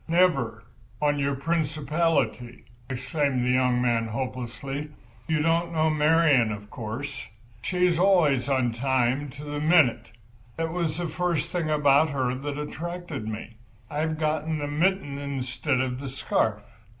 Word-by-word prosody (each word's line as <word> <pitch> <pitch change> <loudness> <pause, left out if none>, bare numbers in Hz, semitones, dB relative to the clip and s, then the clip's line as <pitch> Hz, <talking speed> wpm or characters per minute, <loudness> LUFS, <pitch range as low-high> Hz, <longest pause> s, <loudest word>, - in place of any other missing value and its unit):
"Never, 140 -10 +2 0.4
on 145 0 +1
your 140 0 0
principality!" 155 -4 0 0.3
exclaimed 130 0 -1
the 125 - +2
young 125 -1 +3
man, 115 -2 +1
hopelessly. 130 +4 -4 0.4
"You 155 -1 +1
don't 165 +1 +1
know 160 -1 +2
Marian—of 150 -10 +3
course. 125 +5 -5 0.3
She's 180 +2 +1
always 160 -9 +3
on 130 -3 +2
time, 130 +3 0
to 140 +3 -10
the 145 0 -4
minute. 155 -5 +3 0.5
That 165 0 -2
was 165 -3 -1
the 175 -1 -2
first 170 -1 -1
thing 170 -4 -1
about 150 0 +4
her 130 -3 0
that 140 +2 -4
attracted 160 -3 -5
me. 110 +1 -6 0.3
I've 155 +1 -1
got 155 -1 0
the 155 -2 -2
mitten 150 -1 0
instead 140 0 -2
of 130 -1 -1
the 140 0 -5
scarf. 110 -5 0
145 Hz, 140 wpm, -26 LUFS, 130-160 Hz, 0.5 s, about